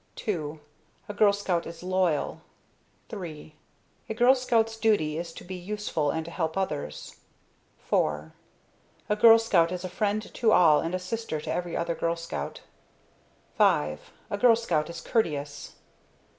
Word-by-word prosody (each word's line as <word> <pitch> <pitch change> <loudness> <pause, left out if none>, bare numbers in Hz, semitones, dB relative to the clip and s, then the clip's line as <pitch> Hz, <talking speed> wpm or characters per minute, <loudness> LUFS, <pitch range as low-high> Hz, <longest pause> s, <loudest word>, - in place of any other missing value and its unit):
II 155 -6 -2 0.5
A 205 - -5
Girl 205 0 +5
Scout 190 -4 -1
is 165 +1 -9
loyal. 185 -4 0 0.7
III 160 -6 -8 0.5
A 220 - -3
Girl 245 +3 +6
Scout's 230 -4 +1
Duty 210 -9 +1
is 170 -1 -5
to - - -10
be 185 - -8
useful 180 -5 -2
and 160 +2 -2
to 170 - -8
help 160 0 -2
others. 195 - -4 0.7
IV - - 0 0.8
A 210 - +3
Girl 225 +1 +8
Scout 180 -7 +2
is 180 0 -4
a 185 - -4
friend 210 +3 -2
to 225 -2 +2
all, 160 -7 +6
and 165 +2 -2
a - - -2
sister 185 -3 -4
to - - -3
every 175 -1 -3
other 170 0 -1
Girl 165 0 -1
Scout. 165 0 -6 1.0
V - - +7
A 75 - -1
Girl 240 -1 +6
Scout 195 -10 -1
is 170 - -7
Courteous. 145 -9 -2
180 Hz, 155 wpm, -27 LUFS, 160-215 Hz, 1.0 s, Girl